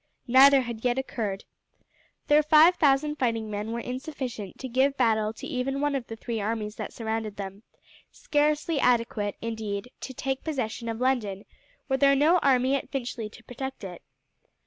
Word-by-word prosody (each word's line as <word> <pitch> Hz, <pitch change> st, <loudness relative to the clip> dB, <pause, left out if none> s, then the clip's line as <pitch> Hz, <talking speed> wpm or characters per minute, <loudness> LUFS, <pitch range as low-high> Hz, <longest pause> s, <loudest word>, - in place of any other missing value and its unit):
Neither 270 Hz, +2 st, +7 dB
had 235 Hz, -3 st, -6 dB
yet 245 Hz, 0 st, +1 dB
occurred. 220 Hz, -6 st, -3 dB, 0.8 s
Their 295 Hz, +1 st, +5 dB
five 310 Hz, +3 st, +6 dB
thousand 295 Hz, +1 st, +2 dB
fighting 230 Hz, -4 st, -1 dB
men 210 Hz, +2 st, -4 dB
were 235 Hz, -, -3 dB
insufficient 250 Hz, -, -6 dB
to 260 Hz, -, -6 dB
give 265 Hz, +3 st, +1 dB
battle 220 Hz, -3 st, +2 dB
to -, -, -9 dB
even 270 Hz, -1 st, -2 dB
one 290 Hz, 0 st, 0 dB
of 265 Hz, -4 st, -3 dB
the 225 Hz, -, -6 dB
three 225 Hz, -1 st, -4 dB
armies 210 Hz, 0 st, -3 dB
that -, -, -5 dB
surrounded 220 Hz, -2 st, -3 dB
them 195 Hz, 0 st, -7 dB, 0.5 s
scarcely 300 Hz, +1 st, 0 dB
adequate, 230 Hz, -5 st, +1 dB
indeed, 220 Hz, 0 st, -4 dB
to -, -, -6 dB
take 265 Hz, +1 st, -3 dB
possession 240 Hz, -6 st, -3 dB
of 225 Hz, 0 st, -4 dB
London 225 Hz, -7 st, 0 dB, 0.4 s
were 265 Hz, -, +1 dB
there 275 Hz, 0 st, +5 dB
no 315 Hz, +6 st, +4 dB
army 265 Hz, -2 st, +3 dB
at 275 Hz, -, -4 dB
Finchley 240 Hz, -5 st, -4 dB
to 230 Hz, +2 st, -16 dB
protect 265 Hz, +1 st, -7 dB
it. 180 Hz, -3 st, -8 dB
250 Hz, 170 wpm, -27 LUFS, 220-275 Hz, 0.8 s, Neither